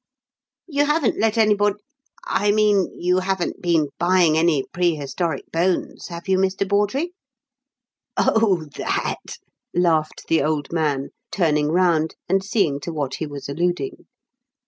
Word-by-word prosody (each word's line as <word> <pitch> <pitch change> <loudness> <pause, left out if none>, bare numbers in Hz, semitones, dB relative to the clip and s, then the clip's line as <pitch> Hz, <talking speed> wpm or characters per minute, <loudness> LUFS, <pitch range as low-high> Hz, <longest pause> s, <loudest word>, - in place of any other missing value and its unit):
You 290 -3 +1
haven't 295 -4 +1
let 220 +1 +1
anybody 205 -2 +3 0.5
I 205 - +1
mean, 205 -3 +3
you 180 +1 +2
haven't 185 -1 -2
been 165 -5 +2
buying 175 -2 +4
any 160 -4 +3
prehistoric 165 -2 -1
bones, 175 +2 -1
have 170 +1 -8
you, 190 -1 +2
Mr. 190 +1 0
Bawdrey?" 210 - 0 1.0
"Oh, 200 -8 +2
that?" - - -3 0.4
laughed 165 -3 +1
the 165 - +3
old 150 +1 -1
man, 145 -4 0 0.2
turning 150 -5 +1
round 165 -1 +2
and 190 +1 +2
seeing 195 -9 +1
to 170 - -5
what 145 -4 -3
he 160 - -3
was 145 -1 -7
alluding. 175 - -2
175 Hz, 130 wpm, -22 LUFS, 155-200 Hz, 1.0 s, buying